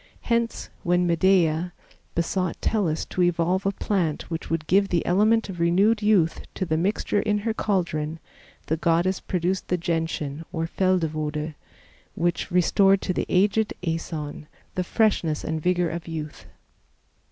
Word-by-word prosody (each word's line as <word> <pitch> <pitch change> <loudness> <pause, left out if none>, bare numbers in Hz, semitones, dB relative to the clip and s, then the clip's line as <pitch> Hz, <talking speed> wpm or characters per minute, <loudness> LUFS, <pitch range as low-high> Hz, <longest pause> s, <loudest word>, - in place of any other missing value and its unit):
Hence, 235 -1 -1
when 175 0 +2
Medea 175 -1 +2 0.4
besought 180 +1 -1
Tellus 180 -8 0
to 185 - -3
evolve 175 +2 +1
a - - +2
plant 175 -7 -2
which 165 - -4
would 165 -1 -1
give 195 +4 +3
the 175 -3 0
element 215 +5 +3
of 185 -3 -7
renewed 195 +6 +3
youth 200 -6 +3
to 185 - -1
the 160 -2 0
mixture 200 +4 0
in 210 -1 +1
her 220 +2 -1
caldron, 165 -7 -1 0.5
the 160 - -1
goddess 170 +4 +1
produced 180 +1 -2
the 180 - +1
Gentian 165 -3 -2
or 165 -1 -2
Feldewode, 160 -4 -1 0.6
which 170 0 -1
restored 195 +2 +4
to 185 - -1
the - - -2
aged 205 +3 +2
Aeson 160 -3 -4 0.3
the 185 - -1
freshness 175 -7 +1
and 160 0 -2
vigor 180 -1 +1
of 170 0 -6
youth. 155 -2 -6
175 Hz, 145 wpm, -25 LUFS, 165-195 Hz, 0.6 s, restored